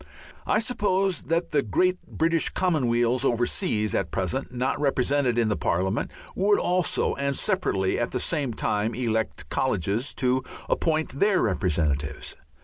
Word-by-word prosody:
I - - +3
suppose 195 -5 +1
that 165 +2 0
the 150 -2 +3
great 180 - +1
British 165 0 +1
common 165 -9 +1
weals 120 +2 +2
over 120 -3 +2
seas, 110 - -1
at 95 - 0
present 95 +10 -2
not 125 +3 -1
represented 135 -2 +1
in 110 -3 +2
Parliament, 95 +5 0 0.3
would 205 +2 +3
also 180 -1 +1
and 140 0 -1
separately 95 -1 0
at 120 - 0
the 125 - -2
same 145 -5 -1
time 105 +2 0
elect 110 -3 -2
colleges 110 - 0
to 130 0 +1 0.2
appoint 155 -4 0
their 200 -2 +3
representatives. 80 -8 -1
130 Hz, 140 wpm, -25 LUFS, 110-165 Hz, 0.3 s, I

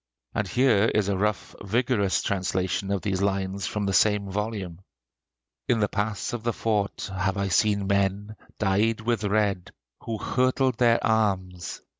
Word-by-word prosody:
And 105 - -1
here 120 -3 +3
is 105 -2 +2
a 100 - +1
rough, 105 +1 -1
vigorous 110 -1 +1
translation 95 0 -1
of 100 -2 -1
these 95 -3 -1
lines 95 -1 -1
from 105 -1 -2
the 100 - 0
same 105 -1 +2
volume: 100 -4 -4 0.9
"In 120 - +2
the 105 - +2
pass 105 +2 -2
of 120 - -3
the 115 +1 -1
fort 105 -3 -1
have 95 +1 -1
I 100 0 -1
seen 100 +3 +2
men, 100 +2 0 0.2
dyed 110 +3 +1
with 115 -2 -1
red, 100 -3 0 0.4
who 115 -1 -3
hurtled 130 +1 +1
their 120 -2 +5
arms.... 95 -5 -1
100 Hz, 155 wpm, -26 LUFS, 95-110 Hz, 0.9 s, their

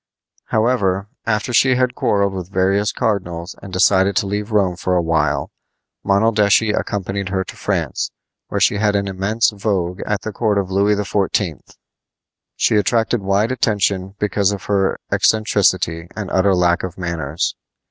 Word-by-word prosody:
However, 105 -4 0 0.2
after 110 +3 0
she 130 +2 +4
had 125 0 +1
quarreled 100 -4 +1
with 90 -2 -6
various 100 +2 +1
cardinals 90 -7 -2
and 100 - -10
decided 95 +1 +3
to - - +1
leave 105 +2 -3
Rome 95 -4 +2
for 90 +1 -1
a 90 - +3
while, 80 -3 0 0.5
Monaldeschi 105 +1 +3
accompanied 100 -2 -3
her 95 0 -1
to - - -10
France, - - -2 0.4
where - - -2
she - - +3
had 105 0 +1
an 100 0 0
immense 100 +5 0
vogue 95 -3 -2
at 105 -2 -1
the 110 - -4
court 105 -1 0
of 95 -2 -1
Louis 100 +2 +2
XIV. 100 -5 -2 0.8
She - - +2
attracted 115 +2 +1
wide 100 +4 +1
attention 100 -5 0
because 100 -1 +1
of 100 -2 -5
her 100 -2 +1
eccentricity 95 -6 +2
and 105 -4 -5
utter 95 0 +3
lack 90 -1 +2
of 95 -2 -6
manners. 85 -4 -2
100 Hz, 155 wpm, -19 LUFS, 95-105 Hz, 0.8 s, she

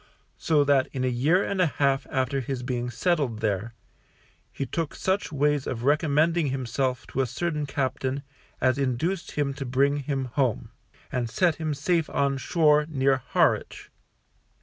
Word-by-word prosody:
So 150 -3 +3
that 140 -2 +3
in 130 - -2
a - - +1
year 145 +10 +2
and 195 -2 -1
a 180 - +4
half 140 -2 0
after 130 +1 -1
ms 130 -3 -3
being 125 -1 -2
settled 140 -2 0
there, 110 +1 -2 0.8
he 135 - -4
took 165 +2 -3
such 190 -1 -1
ways 145 -1 +1
of 120 -2 -4
recommending 155 +3 +2
himself 130 0 -2
to 135 - -1
a 130 - 0
certain 150 +3 -2
captain 135 0 -2 0.4
as 130 +1 +2
induced 140 +8 -1
him 145 -2 0
to 135 - -5
bring 135 +3 +2
him 135 -1 -2
home, 130 -2 -1 0.4
and 120 -2 -1
set 170 +6 +2
him 155 -2 -2
safe 165 +2 0
on 140 -1 0
shore 150 -1 +3
near 135 -2 +2
Harwich. 130 - 0
140 Hz, 160 wpm, -26 LUFS, 130-150 Hz, 0.8 s, a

